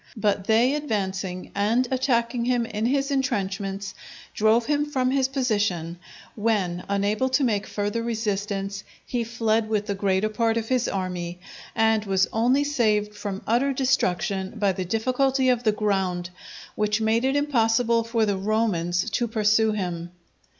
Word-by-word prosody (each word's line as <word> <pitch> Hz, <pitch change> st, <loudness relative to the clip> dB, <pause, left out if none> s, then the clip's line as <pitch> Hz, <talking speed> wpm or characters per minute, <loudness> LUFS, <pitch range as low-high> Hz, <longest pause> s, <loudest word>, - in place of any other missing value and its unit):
But 205 Hz, -2 st, 0 dB
they 235 Hz, +5 st, +3 dB
advancing 195 Hz, -9 st, -3 dB
and 225 Hz, +5 st, +1 dB
attacking 240 Hz, -2 st, +1 dB
him 245 Hz, -1 st, +1 dB
in 220 Hz, 0 st, -2 dB
his 275 Hz, +2 st, 0 dB
intrenchments, 195 Hz, -7 st, -2 dB, 0.4 s
drove 220 Hz, +2 st, +3 dB
him 295 Hz, +1 st, +1 dB
from 260 Hz, -3 st, 0 dB
his 265 Hz, -1 st, +2 dB
position; 205 Hz, -, -1 dB, 0.3 s
when, 200 Hz, -5 st, -1 dB
unable 205 Hz, +5 st, +1 dB
to 265 Hz, +2 st, +2 dB
make 210 Hz, -5 st, 0 dB
further 205 Hz, +3 st, -2 dB
resistance, 205 Hz, -3 st, -2 dB, 0.2 s
he 245 Hz, -2 st, -2 dB
fled 225 Hz, -1 st, 0 dB
with 210 Hz, -2 st, 0 dB
the 205 Hz, -, -2 dB
greater 195 Hz, +1 st, +1 dB
part 225 Hz, +1 st, 0 dB
of 225 Hz, -1 st, -3 dB
his 255 Hz, -2 st, +1 dB
army, 180 Hz, -2 st, -3 dB, 0.4 s
and 220 Hz, -1 st, +3 dB
was 195 Hz, -1 st, +2 dB
only 250 Hz, +5 st, +3 dB
saved 215 Hz, -7 st, +1 dB
from 205 Hz, -2 st, -5 dB
utter 255 Hz, +5 st, +2 dB
destruction 200 Hz, -7 st, 0 dB
by 205 Hz, -2 st, +2 dB
the 185 Hz, 0 st, -4 dB
difficulty 255 Hz, +6 st, +1 dB
of 245 Hz, -2 st, +2 dB
the 215 Hz, -, +5 dB
ground, 190 Hz, -4 st, -1 dB, 0.4 s
which 210 Hz, 0 st, 0 dB
made 220 Hz, +2 st, +1 dB
it 265 Hz, +1 st, +1 dB
impossible 235 Hz, -5 st, +2 dB
for 230 Hz, -1 st, +1 dB
the 200 Hz, -2 st, 0 dB
Romans 190 Hz, -4 st, 0 dB
to 240 Hz, -, 0 dB
pursue 220 Hz, 0 st, +2 dB
him. 175 Hz, -4 st, -3 dB
220 Hz, 150 wpm, -25 LUFS, 195-240 Hz, 0.4 s, the